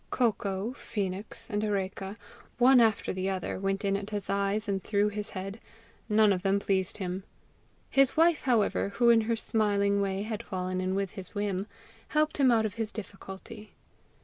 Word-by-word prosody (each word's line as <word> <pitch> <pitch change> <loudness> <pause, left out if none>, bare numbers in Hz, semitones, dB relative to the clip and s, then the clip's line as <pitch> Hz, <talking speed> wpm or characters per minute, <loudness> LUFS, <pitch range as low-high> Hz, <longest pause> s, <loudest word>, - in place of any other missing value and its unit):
COCOA, 210 -2 0
PHOENIX, 205 -5 -5
and 205 0 0
ARECA, 195 0 -2 0.4
one 250 +1 +7
after 220 -2 +2
the 190 +1 -2
other, 185 -1 -3
went 195 +1 -1
in 195 0 +2
at 200 +1 -4
his 205 -2 -2
eyes 200 +2 0
and 195 -2 -1
through 205 0 +2
his 210 0 -5
head; 195 +3 -5 0.5
none 210 -1 +5
of 180 - -2
them 195 +1 +2
pleased 190 -2 0
him. 185 -1 -4 0.6
His 275 +2 +3
wife, 330 -1 +4
however, 230 -5 +2
who 235 -1 +5
in 230 -1 +5
her 230 +1 0
smiling 200 -3 +1
way 195 0 -1
had 215 -1 -4
fallen 185 -1 -3
in 185 0 -1
with 195 -1 -1
his 190 0 -7
whim, 205 -1 -1 0.4
helped 305 0 +1
him 275 -3 +5
out 225 -2 +4
of 210 - -2
his 225 -1 -3
difficulty. 205 0 -9
205 Hz, 175 wpm, -29 LUFS, 195-220 Hz, 0.6 s, one